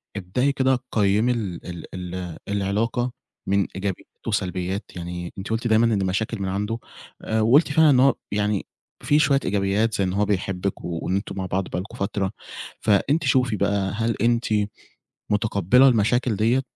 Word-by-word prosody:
ابدئي 105 +9 0
كده 130 -2 +2
قيّّمي 105 +3 +2
ال 90 -6 -6
ال 90 -2 -6
العلاقة 105 +5 0 0.4
من 100 0 +2
إيجابيات 95 -1 -4 0.2
وسلبيات، 95 -2 -2
يعني 90 0 -6
أنتِ 95 - -6
قُلتِ 115 +2 -1
دايمًا 110 +1 +4
إن 110 -4 +2
المشاكل 100 +4 -1
من 95 - -1
عنده 105 +4 -2 0.4
آآ، 110 0 0
وقُلتِ 140 +8 +4
فعلًا 160 +1 +5
إن 130 -3 +5
هو 135 +1 +5 0.2
يعني 105 -1 0 0.4
فيه 150 +1 +3
شوية 140 -3 +4
إيجابيات 100 +3 +1
زي 100 - +1
إن 90 -1 -1
هو 105 +2 +2
بيحبِّك 95 -1 -2
وإن 85 +2 -2
أنتم 100 - -3
مع 95 - -2
بعض 95 +1 -2
بقى - - -2
لكم 95 +4 -8
فترة، 100 0 -1 0.5
فأنتِ 140 - +2
شوفي 125 -4 +2
بقى 100 -1 0
هل 115 0 0
أنتِ 120 0 +2 0.8
متقبّلة 105 +4 +4
المشاكل 120 0 +2
ديّة 115 +6 +2
105 Hz, 160 wpm, -23 LUFS, 95-115 Hz, 0.8 s, فعلًا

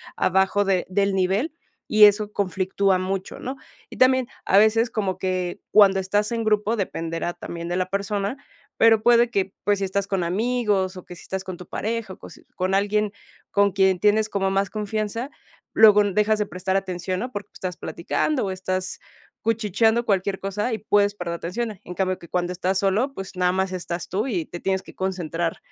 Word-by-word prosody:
abajo 190 +2 +2
de 190 -2 +1
del 200 +1 +1
nivel, 195 - 0 0.4
y 215 -1 +8
eso 210 0 +3
conflictúa 190 0 +1
mucho, 190 +1 -4
¿no?, 260 +2 -5 0.3
y - - -11
también, 260 -1 +4 0.2
a 195 - +4
veces, 220 +3 +4
como 195 -5 -2
que 185 -1 -2
cuando 195 -2 +6
estás 205 +4 0
en 230 -1 -1
grupo 210 +1 +1
dependerá 165 -4 -3
también 170 -1 -7
de 175 - -1
la 185 0 0
persona, 200 +4 -2 0.4
pero 225 -1 +5
puede 240 0 +5
que, 195 -4 -1
pues, 205 -1 +2
si 195 - 0
estás 200 +1 -2
con 195 -3 -1
amigos 200 -1 0
o 180 - -10
que 180 - -10
si - - -13
estás 190 0 -4
con 185 -2 -7
tu 180 - -11
pareja 220 -2 -3
o - - -14
cos - - -13
con 185 +1 -1
alguien 205 +1 +1 0.4
con 200 0 +3
quien 190 -1 +2
tienes 215 +2 +3
como 195 -1 0
más 195 0 +1
confianza, 215 +4 -3 0.4
luego 210 -2 +7
n 205 -2 0
dejas 210 +2 +2
de 210 - +1
prestar 185 +1 -3
atención, 185 -1 -2
¿no?, 245 +4 -4
porque 205 -2 -6
estás 180 -2 -5
platicando 255 - -1
o 190 - -2
estás 185 0 -3 0.4
cuchicheando 225 +1 +1
cualquier 195 -1 0
cosa, 205 +5 -2
y 220 - -2
puedes 205 0 +2
perder 170 -3 -4
atención, 205 +4 -4
en 180 - -8
cambio 185 0 -1
que 170 - -12
cuando 180 0 -1
estás 185 +2 -1
solo, 210 +8 +1
pues, 195 -5 -8
nada 180 0 +2
más 190 0 -1
estás 175 -1 -5
tú 200 +5 -1
y 180 -10 -1
te 175 - -8
tienes 190 +1 -1
que - - -14
concentrar 175 -3 -2
195 Hz, 195 wpm, -23 LUFS, 185-215 Hz, 0.4 s, y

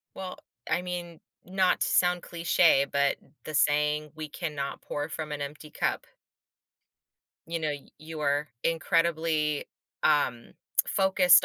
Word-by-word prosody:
Well, 185 -1 -6 0.3
I 180 - +2
mean, 175 -2 -5 0.2
not 185 0 +2
to - - +2
sound 180 -1 +3
cliche, 165 -4 +4
but 140 0 +2 0.3
the 155 - -6
saying 150 +1 +2
"We 155 -1 -6
cannot 145 -3 -4
pour 145 +1 -3
from 155 -1 -5
an 145 -1 -3
empty 150 +2 -7
cup." - - -1 1.4
You 165 0 -2
know, 155 -1 0 0.3
you 155 0 -7
are 145 +1 +1 0.2
incredibly, 165 -2 +1 0.4
um, 135 -6 +2 0.3
focused 190 -1 +5
155 Hz, 125 wpm, -28 LUFS, 150-175 Hz, 1.4 s, focused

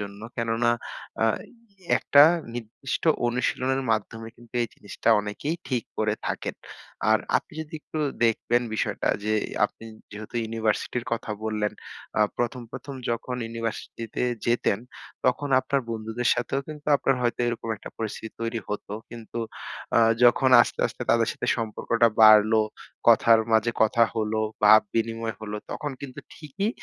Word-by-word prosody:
জন্য। 100 0 -7 0.2
কেননা 115 +1 +1 0.5
আ - - +5 0.7
একটা 145 0 +6 0.3
নির্দিষ্ট 120 +3 -5 0.2
অনুশীলনের 125 +2 0
মাধ্যমে 115 +1 -2
কিন্তু 120 0 -19
এই - - -1
জিনিসটা 100 - -4
অনেকেই 125 +11 -3
ঠিক 125 -4 -1
করে 110 -1 +1
থাকেন। - - -3 0.6
আর 110 - +5 0.2
আপনি 170 - -5
যদি 160 +1 -8
একটু 155 - -6 0.3
দেখবেন 120 +1 +2
বিষয়টা - - -1 0.2
যে 110 - 0 0.3
আপনি 115 - -5 0.3
যেহেতু 105 +2 -9
ইউনিভার্সিটির 110 +2 -1
কথা 115 -1 -2
বললেন, 105 -1 -1 0.5
আ - - +3 0.2
প্রথম, 120 +1 -1
প্রথম, 140 - -7 0.2
যখন 125 +2 -3
ইউনিভার্সিটিতে 115 0 -5 0.2
যেতেন 120 -4 +2 0.5
তখন 130 +3 +1
আপনার 135 +1 0
বন্ধুদের 110 +2 -2
সাথেও 125 +3 -1
কিন্তু 150 -1 -9
আপনার 135 -1 +1
হয়তো 120 0 0
এরকম 115 -1 -4
একটা 105 - -10
পরিস্থিতি 110 0 -5
তৈরি 115 0 -2
হতো। 105 0 -5 0.2
কিন্তু 120 0 -8 0.6
আ - - +7 0.3
যখন 130 +2 +5
আস্তে, - - -5
আস্তে - - -7
তাদের 115 -1 +3
সাথে 125 - -5
সম্পর্কটা 115 +1 +1
বাড়লো, 110 +1 +7 0.5
কথার 115 -1 +6
মাঝে 110 +2 +3
কথা 115 +2 +3
হলো, 110 0 0 0.2
ভাব 110 +1 +9
বিনিময় 115 0 -1
হল 105 -1 -6 0.2
তখন 150 -1 -4
কিন্তু 135 -3 -8
ঠিকই 160 +8 -3
115 Hz, 140 wpm, -26 LUFS, 110-125 Hz, 0.7 s, ভাব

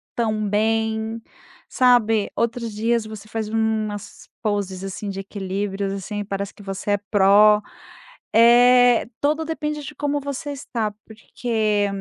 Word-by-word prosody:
tão 215 -3 -1
bem, 220 +1 0 0.5
sabe? 225 -4 +3
Outros 235 -1 -2
dias, 225 +2 0
você 215 -1 -9
faz 220 -1 -3
umas 220 -2 -2 0.2
poses, 200 -3 -2
assim, 195 +1 -5
de 195 0 -5
equilíbrios 195 0 -3
assim, 205 +1 -5
parece 200 0 -4
que 205 - -15
você 195 +1 -4
é - - +2
pro. 210 +1 +6 0.7
É, 245 +1 +6
todo 305 +3 +1
depende 300 -2 -3
de 295 - -9
como 290 0 -1
você 285 +1 -5
está, 235 -6 -3
porque 220 -2 -1
220 Hz, 130 wpm, -22 LUFS, 205-240 Hz, 0.7 s, pro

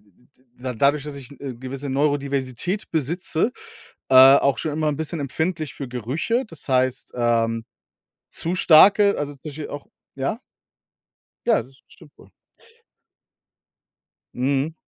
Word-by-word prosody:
d 105 +4 -30 0.3
d 125 -1 -4
dadurch, 140 +3 +2
dass 150 -1 -7
ich 135 -1 -9
'ne 140 -2 -8
gewisse 135 +2 -6
Neurodiversität 140 - -1
besitze 165 - -1 0.6
äh, - - +3 0.2
auch 140 -1 +1
schon 155 - -3
immer 155 0 0
'n 145 - -1
bisschen 160 0 -4
empfindlich 155 +1 -3
für 140 - -6
Gerüche. 150 - -2
Das 165 -6 -8
heißt, 130 -1 0
ähm, 115 -1 +1 0.6
zu 170 +2 -3
starke 195 +4 +6
also 145 0 -3
zum 140 - -22
Beispiel 150 0 -7
auch 145 - -8 0.3
ja? 135 - -2 1.1
Ja, 230 - +3
das 130 +3 -21
stimmt 145 - -19
wohl. - - -18 2.0
Mhm. 140 +4 -1
140 Hz, 135 wpm, -22 LUFS, 130-160 Hz, 2.0 s, starke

